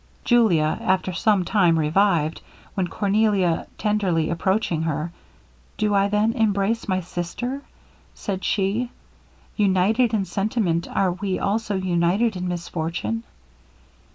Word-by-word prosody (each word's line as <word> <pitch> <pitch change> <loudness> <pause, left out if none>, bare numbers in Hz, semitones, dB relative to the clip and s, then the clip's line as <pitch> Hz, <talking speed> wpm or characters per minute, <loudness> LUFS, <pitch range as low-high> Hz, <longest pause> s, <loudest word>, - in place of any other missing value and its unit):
Julia, 180 -11 +3
after 185 0 0
some 205 -1 +2
time 175 -6 +3
revived, 160 0 +2 0.3
when 185 -2 -1
Cornelia 200 -3 +1
tenderly 190 -7 0
approaching 180 -1 0
her, 160 +1 -2 0.7
'Do 210 -1 +1
I 200 0 +3
then 210 +2 +1
embrace 220 -1 0
my 185 -2 0
sister!' 180 +11 -4 0.5
said 190 -2 -4
she. 205 +5 0 0.7
'United 210 +4 +2
in 200 -3 0
sentiment, 195 -4 -1
are 190 -2 +1
we 185 +1 -2
also 210 0 -1
united 185 +4 +1
in 180 0 -3
misfortune?' 175 +4 -3
195 Hz, 115 wpm, -23 LUFS, 175-215 Hz, 0.7 s, Julia